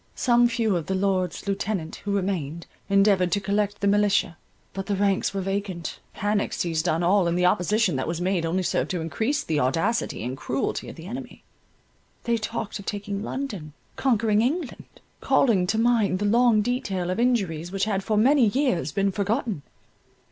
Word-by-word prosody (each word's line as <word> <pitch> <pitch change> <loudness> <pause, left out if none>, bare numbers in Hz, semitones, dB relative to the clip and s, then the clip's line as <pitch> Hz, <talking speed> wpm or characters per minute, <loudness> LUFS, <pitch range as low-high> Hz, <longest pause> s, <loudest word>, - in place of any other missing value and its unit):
Some 240 -1 +4
few 230 -4 0
of 165 -3 -3
the 190 - 0
Lords 185 -2 -1
Lieutenant 195 -4 -2
who 205 - -5
remained, 170 -5 -2 0.2
endeavoured 195 -2 +3
to 205 - +2
collect 205 +1 -1
the 200 - +2
militia—but 200 -2 -1
the 205 - 0
ranks 195 0 +1
were 195 0 -3
vacant, 195 -3 -3 0.2
panic 205 0 0
seized 165 0 -1
on 165 +2 +1
all, 185 +1 +3
and 170 +1 0
the 180 - +2
opposition 180 -1 +2
that 130 - -2
was 165 0 -2
made 180 -1 0
only 175 +3 0
served - - 0
to 180 - -2
increase 220 - -1
the 155 -2 -1
audacity 165 - 0
and 125 +2 -4
cruelty 130 +1 -2
of - - -9
the 165 - -11
enemy. 245 +5 -8 0.8
They 235 -1 +1
talked 220 -1 -4
of 200 - -11
taking 205 -1 -3
London, 210 - -5 0.2
conquering 225 -5 +2
England—calling 240 - 0
to 210 +4 0
mind 225 -4 +2
the 205 - -2
long 230 0 +4
detail 195 -7 -2
of 185 - -2
injuries 190 -9 0
which 195 0 -1
had 200 -3 -1
for 215 0 0
many 255 +2 +5
years 205 - 0
been 195 +4 +1
forgotten. 205 - -1
200 Hz, 175 wpm, -25 LUFS, 180-220 Hz, 0.8 s, many